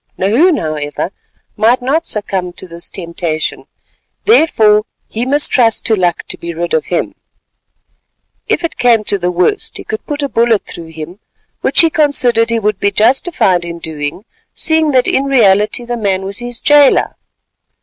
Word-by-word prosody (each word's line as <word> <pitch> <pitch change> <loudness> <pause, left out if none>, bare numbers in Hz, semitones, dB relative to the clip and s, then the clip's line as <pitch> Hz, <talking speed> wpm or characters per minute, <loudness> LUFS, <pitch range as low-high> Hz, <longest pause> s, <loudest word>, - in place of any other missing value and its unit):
Nahoon, 280 - +3
however, 155 - -4 0.4
might 230 +4 +3
not 285 +7 -1
succumb 190 -4 -2
to 185 - -7
this 170 0 -8
temptation; 170 -3 -4 0.6
therefore 220 - +4 0.2
he 235 +3 -4
must 290 +2 +2
trust 230 -4 +2
to 220 - +3
luck 175 -3 0
to - - -6
be 170 0 -6
rid 170 +1 -3
of 160 - +1
him. 175 - -2 1.3
If - - 0
it 335 - -3
came 235 -3 +3
to 200 -1 0
the 175 0 -1
worst, 180 - -1
he - - -8
could 435 0 -5
put 295 -1 -3
a - - 0
bullet 230 -3 +1
through 165 -1 -9
him, 160 +4 -9 0.4
which - - +3
he 330 -1 +3
considered 255 -7 +2
he 230 - +1
would 210 -2 -1
be 200 - +2
justified 220 - +2
in 170 0 -6
doing, 160 +3 -6 0.3
seeing 315 -1 +1
that 255 -3 +2
in 270 - +1
reality 215 -3 +2
the 240 0 -3
man 195 -3 -1
was 200 +2 -5
his 240 -1 -6
jailor. 290 -2 +4
215 Hz, 170 wpm, -14 LUFS, 180-260 Hz, 1.3 s, therefore